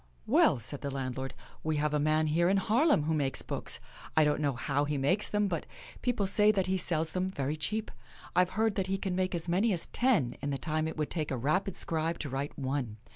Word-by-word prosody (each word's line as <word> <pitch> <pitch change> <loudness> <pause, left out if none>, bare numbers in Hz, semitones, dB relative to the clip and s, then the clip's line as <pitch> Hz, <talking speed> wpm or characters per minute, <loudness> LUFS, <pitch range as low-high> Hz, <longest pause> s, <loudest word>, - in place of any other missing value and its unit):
" 60 0 -33
Well," - - +4
said 120 +5 -3
the 140 - -3
landlord, 135 -1 -4
" - - -25
we 155 -1 0
have 150 0 0
a 150 - +2
man 155 +1 +2
here 170 +3 +2
in 195 - +3
Haarlem 225 - +3
who 160 +2 0
makes 140 -3 +1
books. - - -2 0.4
I 155 - +7
don't 150 0 +1
know 145 -2 +1
how 140 +4 0
he 145 0 -1
makes 165 +10 +1
them, 210 0 +1
but 170 -5 -3 0.3
people 245 -5 0
say 210 +2 +5
that 195 -3 0
he 190 0 0
sells 165 -3 0
them 185 +2 -1
very 145 -4 -2
cheap. 210 +8 -3 0.4
I've 180 0 +4
heard 220 -1 +3
that 190 -1 0
he 195 +1 0
can 190 -2 -2
make 185 0 0
as 170 0 -3
many 195 +6 +2
as 170 - -2
ten 195 - +1
in 145 - -2
the 140 - -1
time 155 +1 -1
it 160 - -5
would 150 -1 -2
take 155 -3 -2
a 130 - -1
rapid 170 +9 0
scribe 165 +1 -1
to 145 - -4
write 135 +2 -4
one. 130 -5 -2
155 Hz, 245 wpm, -30 LUFS, 145-190 Hz, 0.4 s, I